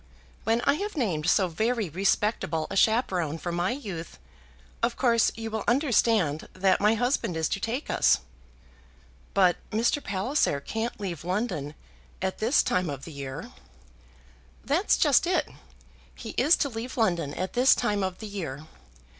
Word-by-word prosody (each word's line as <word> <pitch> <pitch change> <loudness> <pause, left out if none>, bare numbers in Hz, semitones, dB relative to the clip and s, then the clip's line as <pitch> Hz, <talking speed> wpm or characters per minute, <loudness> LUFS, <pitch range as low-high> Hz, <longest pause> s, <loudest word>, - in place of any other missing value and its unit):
When 225 +1 +2
I 280 - +3
have 415 -4 -4
named 175 - 0
so 190 -1 +3
very 220 +5 -1
respectable 185 -1 0
a - - -3
chaperon 190 - +2
for 175 +1 -4
my 175 +2 0
youth, 200 - -6 0.6
of 235 +1 +1
course 235 -3 +3
you 225 0 -5
will 220 -1 -2
understand 225 - +2
that 190 0 +2
my 210 +2 +4
husband 230 - 0
is 160 - +1
to - - -1
take 235 +8 -3
us." - - +3 1.2
"But 185 -3 +4
Mr. 235 +7 +1
Palliser 200 - 0
can't 225 +11 -4
leave 180 -7 -5
London 180 - -2 0.4
at 190 0 -3
this 230 +6 +3
time 180 -2 0
of 140 -2 -6
the 165 - -9
year?" 140 +2 -7 1.1
"That's 60 - +2
just - - +4
it. - - +1 0.7
He - - -7
is 295 +7 +4
to 280 - 0
leave 240 +2 -6
London 170 - 0
at 185 +1 -3
this 255 +2 +5
time 205 -1 0
of 185 -1 -2
the 220 - -7
year. 160 -8 -6
200 Hz, 155 wpm, -27 LUFS, 170-230 Hz, 1.2 s, this